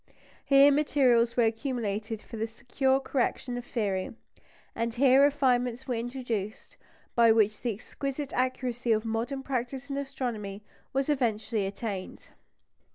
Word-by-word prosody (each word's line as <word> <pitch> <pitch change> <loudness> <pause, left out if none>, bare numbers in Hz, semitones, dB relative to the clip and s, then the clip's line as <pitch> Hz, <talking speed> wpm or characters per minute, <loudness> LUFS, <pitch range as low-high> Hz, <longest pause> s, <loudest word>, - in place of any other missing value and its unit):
Here 275 +1 +6
materials 255 -5 +3
were 240 - +5
accumulated 225 -2 -2
for - - -10
the 225 0 -2
secure 265 +4 0
correction 255 -2 -1
of 245 - -4
theory, 200 -5 -2 0.6
and 230 0 -1
here 265 +1 +5
refinements 260 -3 +2
were 250 - 0
introduced 230 -3 -4 0.4
by 230 -1 +6
which 215 -1 +2
the 240 - 0
exquisite 275 +6 -5
accuracy 250 -2 0
of 215 +1 -1
modern 235 +5 -2
practice 265 +1 -3
in 275 - -2
astronomy 240 -8 -4 0.3
was 270 0 0
eventually 225 -7 0
attained. 195 -1 -6
245 Hz, 130 wpm, -28 LUFS, 225-270 Hz, 0.6 s, Here